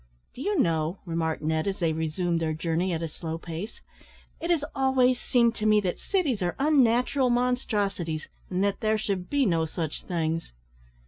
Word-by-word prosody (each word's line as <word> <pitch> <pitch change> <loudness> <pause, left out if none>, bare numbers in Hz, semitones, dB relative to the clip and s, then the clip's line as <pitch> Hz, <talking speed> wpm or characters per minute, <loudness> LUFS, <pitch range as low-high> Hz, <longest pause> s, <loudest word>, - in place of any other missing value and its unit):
"Do 255 - -9
you 405 +6 0
know," 165 - +1
remarked 165 -2 -2
Ned, 160 +3 0
as 195 - -1
they 165 -3 +1
resumed 165 +2 -1
their 160 -1 0
journey 165 +3 -1
at 165 -1 -2
a - - -1
slow 160 +1 -5
pace, 170 +6 -7 0.6
"it 335 - -4
has 325 -4 +2
always 260 -2 +3
seemed 235 -2 +3
to 215 - 0
me 215 0 +6
that 180 -3 -2
cities 300 - 0
are 175 -1 0
unnatural 265 -2 +3
monstrosities, 205 -10 0 0.2
and 185 +1 0
that 200 -1 0
there 215 0 +2
should 195 -4 -3
be 285 -2 +2
no 165 -5 +2
such 160 -1 -4
things!" 165 - -2
190 Hz, 180 wpm, -27 LUFS, 165-245 Hz, 0.6 s, me